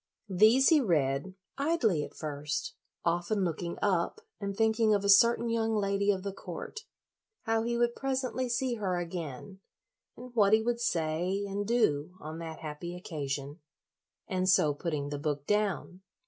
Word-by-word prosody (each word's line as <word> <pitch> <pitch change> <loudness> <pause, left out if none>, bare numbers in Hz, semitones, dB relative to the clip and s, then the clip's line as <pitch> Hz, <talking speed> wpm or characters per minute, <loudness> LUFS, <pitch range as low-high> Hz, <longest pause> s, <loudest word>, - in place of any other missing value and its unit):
These 220 +8 +5
he 315 -3 +5
read, 155 - 0 0.2
idly 260 - +2
at - - -9
first, 150 -1 -4 0.3
often 175 +4 +1
looking 170 +1 -3
up 190 - +1 0.2
and 200 -1 -4
thinking 220 -1 +3
of 200 - -1
a - - +1
certain 235 +4 +6
young 225 -1 0
lady 200 -1 +1
of 190 -2 +1
the 200 -1 -4
court, 435 - -8 0.6
how 225 -1 +1
he 235 +1 -1
would 240 0 +1
presently 260 -1 -2
see 250 +1 0
her 190 -4 -1
again, 175 +1 -6 0.6
and 250 0 -10
what 210 -3 +4
he 220 - +6
would 235 0 0
say 180 -1 0
and 200 +1 -3
do 180 -9 +1
on 155 +2 -7
that 160 -1 -7
happy 160 +3 -6
occasion, 145 -3 -5 0.7
and 185 -1 0
so 155 -6 +4
putting 145 -2 -3
the 145 -1 -4
book 145 -1 -2
down. 205 -2 -1
195 Hz, 160 wpm, -30 LUFS, 160-225 Hz, 0.7 s, certain